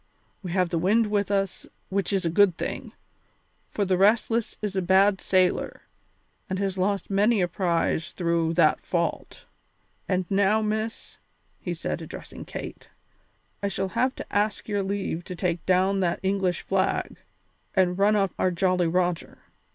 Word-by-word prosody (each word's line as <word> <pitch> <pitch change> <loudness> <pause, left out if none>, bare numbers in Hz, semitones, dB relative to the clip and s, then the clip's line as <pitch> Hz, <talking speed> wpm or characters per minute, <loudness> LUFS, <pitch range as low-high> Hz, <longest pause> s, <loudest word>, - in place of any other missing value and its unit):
We 180 -4 -5
have 180 -2 +2
the 165 - 0
wind 210 +5 +2
with 205 -1 +1
us, 195 -2 -1 0.2
which 195 +1 -1
is 195 -3 0
a 165 - +1
good 190 -1 +4
thing, - - -5 0.8
for 205 - -1
the 185 -1 +1
Restless 225 +3 +2
is 205 -2 -4
a 190 - +1
bad 190 +2 +4
sailer 185 -1 +1 0.7
and 190 - -1
has 195 -1 -1
lost 195 +2 -1
many 205 +3 +3
a 180 - +2
prize 170 -2 0
through 170 -2 0
that 160 -3 +4
fault. 170 -2 -3 0.6
And 185 -1 +1
now, 200 +3 +3
Miss," 215 +1 -3 0.4
he - - -4
said, - - -4
addressing - - -9
Kate, - - -8 0.7
"I 200 - 0
shall 195 0 -2
have 255 +8 0
to - - -9
ask 210 +1 0
your 205 -2 0
leave 190 -3 -3
to 180 - -6
take 175 -2 -1
down 190 +2 +3
that 175 -3 0
English 190 -2 0
flag 190 -1 0 0.6
and 180 -2 +3
run 205 +2 +4
up 195 -3 +2
our 185 - +3
Jolly 180 0 +1
Roger. 175 0 -1
190 Hz, 160 wpm, -26 LUFS, 180-200 Hz, 0.8 s, good